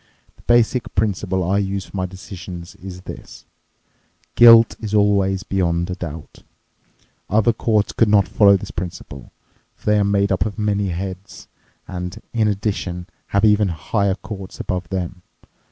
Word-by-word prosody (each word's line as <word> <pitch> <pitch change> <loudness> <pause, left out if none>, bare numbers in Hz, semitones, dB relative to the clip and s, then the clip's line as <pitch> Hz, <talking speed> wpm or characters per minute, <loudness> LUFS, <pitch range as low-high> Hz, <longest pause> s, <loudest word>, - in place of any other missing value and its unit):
The - - -22
basic 120 0 +1
principle 95 -3 0
I 100 +2 +2
use 100 -1 -2
for - - -13
my 95 -1 -1
decisions 90 -2 -9
is 90 -1 -9
this: - - -11 0.9
Guilt 115 -1 +8
is 105 -1 -3
always 100 -2 +2
beyond 85 -2 -1
a - - -1
doubt. 80 -4 -8 0.9
Other 110 +3 +3
courts 110 -2 +1
could 115 - +2
not 100 -2 +4
follow 100 -2 +5
this - - -8
principle, 80 -6 -7 0.4
for - - -27
they 105 0 +3
are - - +3
made 100 0 +1
up 90 -2 +2
of 105 0 -5
many 105 -2 0
heads 95 +2 -6 0.4
and, 90 +2 -6
in 110 -2 +2
addition, 100 -4 -2 0.2
have 100 +2 +2
even 105 -1 +4
higher 95 +3 -1
courts 95 -2 -9
above 90 -2 -3
them. 90 -1 -4
100 Hz, 155 wpm, -20 LUFS, 90-105 Hz, 0.9 s, Guilt